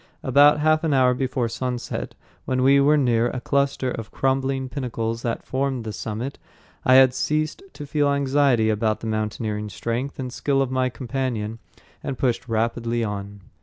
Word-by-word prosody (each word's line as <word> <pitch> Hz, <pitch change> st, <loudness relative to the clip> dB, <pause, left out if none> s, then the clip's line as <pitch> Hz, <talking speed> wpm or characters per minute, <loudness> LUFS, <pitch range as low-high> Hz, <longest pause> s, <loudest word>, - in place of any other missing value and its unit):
About 145 Hz, +1 st, +5 dB
half 155 Hz, +1 st, +3 dB
an 155 Hz, -3 st, +2 dB
hour 130 Hz, -1 st, +4 dB
before 130 Hz, -1 st, -1 dB
sunset, 125 Hz, +1 st, -4 dB, 0.3 s
when 130 Hz, -1 st, 0 dB
we 140 Hz, +1 st, +6 dB
were 145 Hz, +2 st, +4 dB
near 120 Hz, -4 st, +2 dB
a 125 Hz, -, -3 dB
cluster 140 Hz, 0 st, 0 dB
of 115 Hz, -3 st, -6 dB
crumbling 135 Hz, 0 st, 0 dB
pinnacles 115 Hz, -4 st, -3 dB
that 115 Hz, -1 st, -3 dB
formed 130 Hz, -2 st, -1 dB
the 110 Hz, -1 st, -5 dB
summit, 115 Hz, +7 st, -5 dB, 0.4 s
I 130 Hz, -, +5 dB
had 130 Hz, -1 st, +7 dB
ceased 155 Hz, -, -1 dB
to 145 Hz, -, -8 dB
feel 145 Hz, 0 st, +1 dB
anxiety 135 Hz, -5 st, +2 dB
about 110 Hz, 0 st, 0 dB
the -, -, -6 dB
mountaineering 110 Hz, -1 st, -2 dB
strength 120 Hz, +8 st, -3 dB
and 130 Hz, -3 st, -5 dB
skill 140 Hz, -1 st, 0 dB
of 135 Hz, -2 st, 0 dB
my 130 Hz, 0 st, +1 dB
companion, 120 Hz, -3 st, -3 dB, 0.4 s
and 135 Hz, -, -4 dB
pushed 125 Hz, -1 st, -1 dB
rapidly 115 Hz, +1 st, 0 dB
on. 100 Hz, -1 st, -5 dB
130 Hz, 165 wpm, -23 LUFS, 115-140 Hz, 0.4 s, had